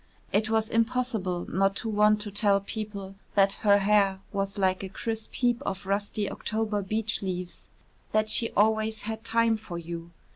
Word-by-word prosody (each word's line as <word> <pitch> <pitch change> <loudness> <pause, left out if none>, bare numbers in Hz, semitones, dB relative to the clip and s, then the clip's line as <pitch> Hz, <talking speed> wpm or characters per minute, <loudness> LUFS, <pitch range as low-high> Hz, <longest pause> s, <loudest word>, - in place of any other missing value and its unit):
It 215 +2 +2
was 220 0 +1
impossible 225 -6 0
not 195 +1 +1
to 225 - -4
want 210 0 +3
to 205 -1 -5
tell 200 -1 +3
people 200 -1 -6 0.2
that 195 -1 +5
her 205 -1 +6
hair 200 -1 +3
was 195 0 -2
like 190 -1 +1
a 195 - -5
crisp 225 +3 -4
heap 240 -2 +1
of 190 0 -4
rusty 205 +1 -1
October 215 -1 -2
beech 215 +3 -1
leaves, 180 -2 -5 0.4
that 215 0 +2
she 230 +1 +2
always 220 +1 +2
had 220 +1 -4
time 230 -1 +2
for 205 -5 -7
you. 170 0 -6
210 Hz, 170 wpm, -28 LUFS, 195-220 Hz, 0.4 s, her